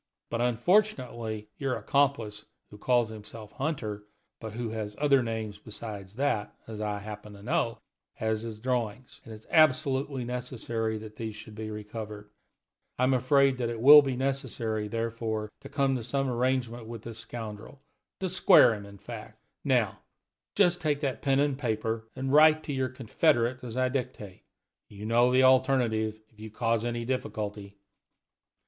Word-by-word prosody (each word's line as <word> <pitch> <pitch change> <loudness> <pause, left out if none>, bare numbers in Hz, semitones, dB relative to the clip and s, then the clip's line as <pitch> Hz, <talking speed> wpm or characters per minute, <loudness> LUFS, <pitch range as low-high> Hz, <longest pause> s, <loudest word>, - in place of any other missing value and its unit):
But, 115 - -1
unfortunately, 120 - +1
your 135 -2 0
accomplice, 120 -7 0 0.2
who 105 - -12
calls 120 -1 +2
himself 110 0 -10
Hunter 110 -8 -3 0.3
but 110 -2 -7
who 120 0 -3
has 110 -2 -5
other 140 -2 +4
names 110 -3 -4
besides 105 -2 -8
that 130 -6 -1
as 110 -1 -7
I 105 -1 -1
happen 105 0 -8
to 100 0 -13
know 120 -3 0 0.4
has 110 -1 -1
the 110 -2 -7
drawings, 120 -1 -3
and 115 - -11
it - - -7
is 110 - -16
absolutely 140 -4 +3
necessary 120 -2 -3
that 110 0 -10
these 110 -2 -5
should 110 0 -11
be 110 0 -6
recovered. 105 -1 -7 0.7
I 125 - +1
am 130 +1 +4
afraid 135 +1 +3
that 120 -2 0
it 115 -1 -4
will 145 +5 +10
be 135 -3 -2
necessary, 125 -5 -2
therefore, 115 -1 -3
to 140 - -11
come 140 -2 +1
to 120 - -6
some 135 +3 -1
arrangement 120 -2 -1
with 115 -2 -8
this 115 -1 -6
scoundrel 110 +2 -8 0.4
to 190 - 0
square 180 - +6
him, 100 -2 -7
in 100 0 -12
fact. - - -9 0.3
Now, - - +1 0.6
just 180 -3 +3
take 150 -2 0
that 135 -4 -2
pen 135 -1 +2
and 140 -1 +1
paper, 110 -2 -2
and 135 +1 -2
write 155 +1 +7
to 145 - -4
your 130 -1 0
confederate 130 0 +1
as 120 -1 -6
I 130 0 +3
dictate. 125 -7 -4 0.5
You 105 +1 -9
know 120 +2 +4
the 130 +1 +5
alternative 125 -5 +3
if 110 - -26
you 110 0 -7
cause 115 +1 0
any 120 -1 -2
difficulty." 105 -5 -4
115 Hz, 165 wpm, -29 LUFS, 110-130 Hz, 0.7 s, will